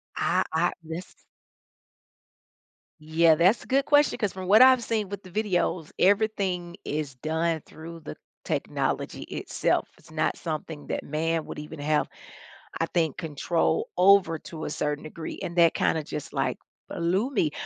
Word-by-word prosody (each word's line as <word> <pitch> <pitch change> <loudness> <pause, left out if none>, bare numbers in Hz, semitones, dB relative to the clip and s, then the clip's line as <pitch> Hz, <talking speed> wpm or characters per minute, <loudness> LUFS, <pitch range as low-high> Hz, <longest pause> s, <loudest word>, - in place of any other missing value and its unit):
I - - +2
I 175 +2 +2
this 165 +3 -8 1.8
Yeah, 160 +1 +4
that's 180 +8 +3
a - - -16
good 270 +1 +2
question 290 0 +4
'cause 210 -6 -1
from 185 -1 -6
what 215 +6 +8
I've 260 -2 +6
seen 215 -4 -1
with 200 -1 -6
the 185 - -13
videos, 185 -4 -1
everything 190 -3 +1
is 150 -2 -3
done 160 +3 -1
through 165 +1 -10
the 155 - -9 0.3
technology - - -2
itself. - - -1
It's - - -20
not - - 0
something 155 -1 -5
that - - -3
man 160 +2 -1
would - - -7
even 150 +1 -8
have, 150 +1 +1 0.7
I - - +3
think, 160 -4 0
control 165 0 -1
over 180 -3 +5
to 155 0 -8
a - - -3
certain 150 0 -2
degree, 160 +1 -7
and 170 - -5
that 170 -1 +6
kinda 160 - +1
just, 150 0 -6
like, - - 0 0.3
blew 185 +9 0
me. 165 - +1
170 Hz, 155 wpm, -26 LUFS, 155-195 Hz, 1.8 s, what